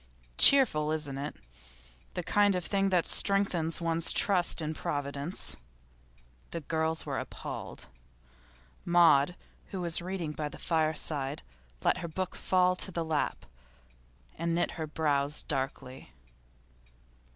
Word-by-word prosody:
'Cheerful, 175 - +7
isn't 145 -3 -3
it? 145 +2 -5 0.8
The 180 - -3
kind 205 +2 +3
of 180 -2 -3
thing 195 -1 +1
that 180 -3 +2
strengthens 190 -5 +1
one's 165 -1 +1
trust 180 -4 +3
in 155 -1 0
Providence.' 145 +2 -4 0.9
The 170 - -5
girls 160 +2 -2
were - - -3
appalled. - - -7 1.0
Maud, 170 -2 +4 0.3
who 190 - -6
was 170 -1 +2
reading 180 -3 -4
by 150 0 -4
the - - -11
fireside, 155 -3 -1 0.4
let - - +2
her 170 - -5
book 185 +3 -4
fall 185 0 +2
to 190 - -3
her 170 - 0
lap, 160 -2 -2 0.9
and 170 0 -1
knit 175 - 0
her 160 -2 -5
brows 150 -2 -1
darkly. 130 - -5
165 Hz, 125 wpm, -30 LUFS, 150-180 Hz, 1.0 s, Cheerful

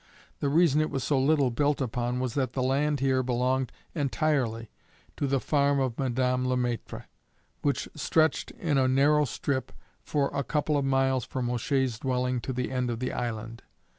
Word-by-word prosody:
The 140 - 0
reason 155 -1 +4
it 155 - 0
was 135 - -3
so 140 -3 +1
little 140 -1 +3
built 145 +4 +1
upon 125 -1 -1
was 125 -2 -2
that 130 -3 -1
the 130 - -1
land 140 +2 +1
here 130 -1 +2
belonged 125 +1 0 0.2
entirely 135 -7 0 0.4
to 140 - -1
the 135 0 +1
farm 140 0 +2
of 130 -3 -1
Madame 125 -1 0
Le 125 0 +1
Maître, 120 -2 -3 0.6
which 140 -1 0
stretched 155 0 +1
in 150 -6 -1
a 130 - +3
narrow 145 +3 +4
strip 130 0 -2 0.3
for 145 -2 0
a 140 - -1
couple 150 +3 0
of 140 -1 +1
miles 135 -1 +2
from 125 0 -3
O'Shea's 125 -1 0
dwelling 125 -1 -1
to 130 - -4
the 125 0 -3
end 125 -1 -1
of 120 - -2
the 130 +2 -3
island. 115 -1 -4
130 Hz, 180 wpm, -28 LUFS, 125-140 Hz, 0.6 s, reason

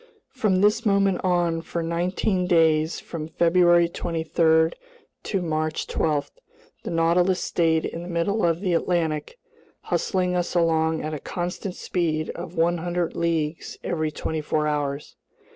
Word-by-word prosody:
From 210 -7 +1
this 210 +3 +3
moment 200 -3 +2
on, 175 -2 +1
for 170 +1 -4
nineteen 180 +3 0
days 160 -2 +3
from 155 -2 -6
February 175 +1 +4
23 160 -1 +1 0.5
to 195 -3 -2
March 155 -1 -1
12, 150 -3 -1 0.5
the - - -6
Nautilus 175 +2 +2
stayed 160 -2 +1
in 165 - -5
the 175 - -8
middle 180 +6 0
of 170 0 +1
the 185 -3 0
Atlantic, 165 - -1 0.4
hustling 180 -2 0
us 175 0 -1
along 160 -1 +2
at 155 +1 -3
a 150 - -4
constant 180 +3 -4
speed 155 -3 -1
of 170 0 -8
100 175 +1 0
leagues 165 -2 -2
every 155 -2 -1
twenty 155 +1 -3
four 150 0 0
hours. 145 -1 -3
170 Hz, 140 wpm, -24 LUFS, 160-180 Hz, 0.5 s, February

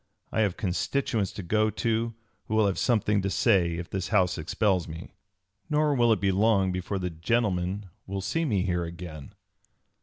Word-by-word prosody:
I 110 - +1
have 100 -4 +1
constituents 105 +2 -1
to 100 - -6
go 110 +5 +2
to 115 +1 -1 0.3
who 110 - -1
will 110 -1 +4
have 100 -2 0
something 105 -4 +2
to 100 - -1
say 95 -5 +3
if 85 0 -5
this 95 -2 -3
House 95 -4 +2
expels 90 +3 +1
me. 80 +2 -9 0.6
Nor 150 -1 +2
will 120 -3 +3
it 110 - +3
be 95 +1 +2
long 100 -1 +3
before 90 +2 -3
the 90 -1 -3
gentlemen 95 +1 0 0.2
will 95 0 -3
see 165 - -1
me 105 - +1
here 90 -2 0
again." 85 -4 -8
100 Hz, 180 wpm, -27 LUFS, 90-110 Hz, 0.6 s, will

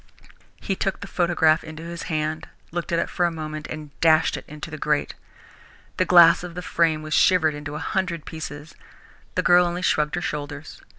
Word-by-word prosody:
He 195 - -2
took 195 0 -2
the - - -5
photograph 170 -4 +2
into 160 0 -9
his 170 +1 -7
hand, 155 -1 -2 0.2
looked 175 0 -4
at 170 - +2
it - - 0
for 175 - 0
a - - -2
moment, 155 -2 -6
and 155 -2 -8
dashed 160 -1 +4
it - - -8
into 150 +1 -8
the 155 - -6
grate. 150 0 0 0.8
The 185 - +2
glass 175 -1 +7
of 175 -1 -8
the 180 - -5
frame 160 -3 +1
was 155 0 -5
shivered 165 -4 +4
into 145 0 -7
a 150 - -5
hundred 180 -5 -2
pieces. 155 -1 -8 0.6
The - - +1
girl 175 0 +6
only 175 +1 -2
shrugged 150 -2 +1
her 175 - -3
shoulders. 145 -1 -6
160 Hz, 195 wpm, -23 LUFS, 155-175 Hz, 0.8 s, glass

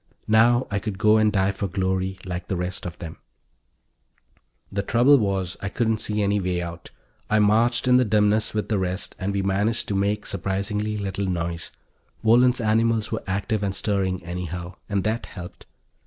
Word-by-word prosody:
Now 120 +3 +4
I 100 - 0
could 100 -1 -5
go 110 +1 +4
and 110 -1 +3
die 95 -1 +2
for 100 +1 -3
glory 95 0 -1
like 90 -1 -5
the 95 - -1
rest 90 +1 -4
of 85 - -8
them. 80 -2 -8 1.5
The 100 - -1
trouble 120 +7 +4
was, 95 -4 -1
I 100 - -3
couldn't 110 0 0
see 105 -1 -1
any 100 +1 +1
way 90 -2 -1
out. 85 -1 -7 0.4
I 110 - +3
marched 115 +4 +3
in 125 0 +6
the 125 - +4
dimness 105 0 +2
with 105 - -1
the 105 -3 +1
rest, 95 +1 -3
and 100 0 -1
we 100 -1 -1
managed 100 +4 +1
to 100 - -1
make 100 +2 0
surprisingly 100 +3 -2
little 100 -1 -3
noise. 85 -2 -2 0.5
Wohlen's 125 +3 +5
animals 115 0 +1
were 110 - -2
active 100 +2 -1
and 100 -1 -1
stirring, 95 -3 0
anyhow, 90 0 -5 0.2
and 100 -2 0
that 110 +2 -2
helped. 90 -2 -10
100 Hz, 180 wpm, -24 LUFS, 95-110 Hz, 1.5 s, in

